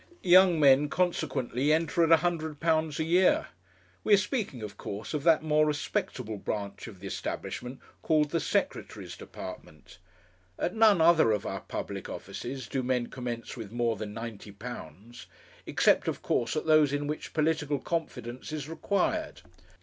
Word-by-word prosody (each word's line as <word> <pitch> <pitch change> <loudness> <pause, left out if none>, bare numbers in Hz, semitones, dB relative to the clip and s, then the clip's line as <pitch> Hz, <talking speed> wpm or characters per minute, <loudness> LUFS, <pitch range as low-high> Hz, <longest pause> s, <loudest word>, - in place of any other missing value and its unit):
Young 180 -2 +6
men 140 0 +5
consequently 145 -6 0
enter 160 +1 +2
at 165 0 +6
£100 160 -2 0
a - - +2
year. 180 +3 +3 0.5
We 210 - +6
are - - +3
speaking, 195 - -2
of 105 - -7
course, 100 +8 -6
of 150 - -1
that 165 -2 +5
more 155 -1 +3
respectable 125 -6 -2
branch 100 +1 -4
of 100 -5 -11
the 95 - -10
establishment 125 +6 -5 0.2
called 150 -2 +2
the 165 - +1
Secretary's - - -2
Department. 75 +3 -10 0.6
At 180 - -1
none 220 -6 +5
other 160 -7 +5
of 105 -2 -1
our - - -4
public - - -6
offices 130 0 -6
do 135 - -2
men 125 -1 -1
commence 120 -3 -5
with 110 -5 -8
more 120 -1 0
than 105 0 -6
£90 115 -2 -8 0.4
except, - - +3
of - - -3
course, 120 - 0
at 155 - -2
those 155 -3 +5
in 145 0 -1
which 150 +1 -5
political 155 -2 +1
confidence 130 -6 -4
is 150 -2 -4
required. 200 - -1
145 Hz, 150 wpm, -29 LUFS, 120-160 Hz, 0.6 s, Young